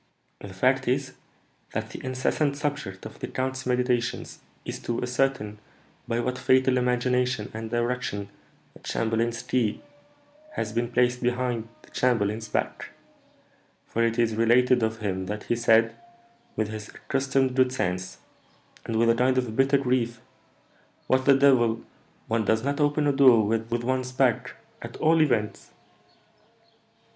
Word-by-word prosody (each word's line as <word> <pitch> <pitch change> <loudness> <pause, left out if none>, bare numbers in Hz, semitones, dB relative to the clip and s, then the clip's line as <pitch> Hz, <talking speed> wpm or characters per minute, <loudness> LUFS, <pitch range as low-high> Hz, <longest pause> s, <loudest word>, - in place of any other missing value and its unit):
"The - - -9
fact - - +1
is, - - 0 0.6
that - - -3
the - - -9
incessant 130 +3 0
subject 145 -10 -4
of - - -10
the - - -4
count's 130 0 -3
meditations 125 -1 -1 0.3
is - - -5
to 120 - -3
ascertain 125 -4 -1 0.5
by 115 0 -1
what 125 +1 -2
fatal 130 0 +3
imagination 125 -2 0
and 110 0 -5
direction 120 -4 -2 0.4
the - - -16
chamberlain's 115 +1 -1
key 115 -5 -1 0.7
has 110 -1 -3
been 120 +1 -1
placed 125 0 +2
behind 125 -2 -1 0.2
the - - -20
chamberlain's 110 -3 0
back; - - -3 1.0
for 115 - -1
it 115 0 +1
is 115 -2 +2
related 120 +3 +4
of 110 0 -1
him 95 -3 -2
that 105 +1 -4
he 120 - 0
said, 115 -1 +3 0.6
with 110 -1 -1
his 110 -1 -7
accustomed 135 -1 -1
good 130 -1 +3
sense, 95 -7 -3 0.7
and 115 - -3
with 115 +1 +3
a 115 - +5
kind 125 +2 +2
of 125 -4 -1
bitter 135 +2 +4
grief, 125 -3 0 0.9
'What, 130 0 +1
the 140 -1 +6
devil! 120 -5 +3 0.4
one 115 0 +1
does 110 +2 +1
not 140 +2 -1
open 145 0 +2
a 145 - +3
door 125 -6 +6
with 115 +2 -1
one's 130 0 -1
back, 130 -3 +1 0.3
at - - -8
all 160 +1 +3
events!'" 120 -8 0
120 Hz, 145 wpm, -26 LUFS, 115-130 Hz, 1.0 s, the